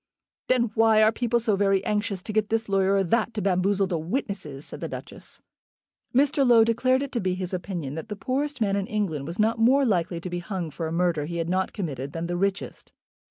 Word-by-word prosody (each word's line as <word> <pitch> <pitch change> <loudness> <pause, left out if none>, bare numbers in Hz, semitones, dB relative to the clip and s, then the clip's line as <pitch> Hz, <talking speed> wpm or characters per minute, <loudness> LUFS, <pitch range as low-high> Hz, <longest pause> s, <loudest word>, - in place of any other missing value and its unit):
"Then 240 -3 +2
why 220 -1 +5
are 215 - +5
people 235 +1 0
so 220 -3 +1
very 195 -1 +2
anxious 205 -3 -1
to 215 - -5
get 215 -1 +1
this 225 0 0
lawyer 195 0 +2
or 195 - +3
that 230 +5 0
to 210 - -1
bamboozle 195 +1 +2
the 175 -3 -2
witnesses?" 160 - -4
said - - -7
the - - -2
Duchess. - - -9 0.7
Mr. 280 +2 +3
Low 240 -3 +6
declared 255 +4 +2
it 280 - -6
to 240 - -1
be 185 -3 -1
his 185 0 -5
opinion 175 -6 -4
that 160 +8 -7
the 210 - -4
poorest 270 +6 -2
man 200 -2 +2
in 200 -1 -1
England 190 - -2
was 170 +2 -5
not 220 +2 +1
more 265 +5 +4
likely 175 -5 0
to 180 - -6
be 175 - -2
hung 175 -2 -4
for 165 +2 -4
a - - -5
murder 170 -3 +1
he 170 +2 -5
had 165 0 -2
not 190 +1 0
committed 140 - -5
than 165 0 -3
the 175 +1 -2
richest. 195 +2 -3
195 Hz, 230 wpm, -25 LUFS, 175-225 Hz, 0.7 s, Low